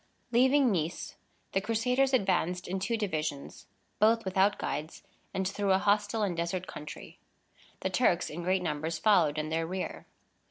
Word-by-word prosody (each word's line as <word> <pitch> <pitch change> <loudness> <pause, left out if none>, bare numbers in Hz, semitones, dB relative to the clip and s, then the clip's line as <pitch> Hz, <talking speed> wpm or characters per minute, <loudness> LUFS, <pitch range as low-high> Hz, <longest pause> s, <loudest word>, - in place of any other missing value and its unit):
Leaving 260 +2 +4
Nice, 170 -2 -2 0.4
the 195 - +1
Crusaders 250 +5 +1
advanced 180 -6 +1
in 190 +1 -2
two 230 +4 -1
divisions, 155 -9 -4 0.3
both 225 +1 +4
without 190 +2 +2
guides, 155 +3 -4 0.3
and 190 0 -1
through 200 0 +1
a - - +5
hostile 205 +2 +1
and 190 -4 0
desert 170 +2 -2
country. 150 -3 -9 0.6
The - - -1
Turks, - - +2
in 165 +3 -6
great 185 +1 +1
numbers, 160 0 -2
followed 160 -5 +3
in 155 0 -2
their 165 0 -1
rear. 185 +1 -5
190 Hz, 155 wpm, -30 LUFS, 165-215 Hz, 0.6 s, a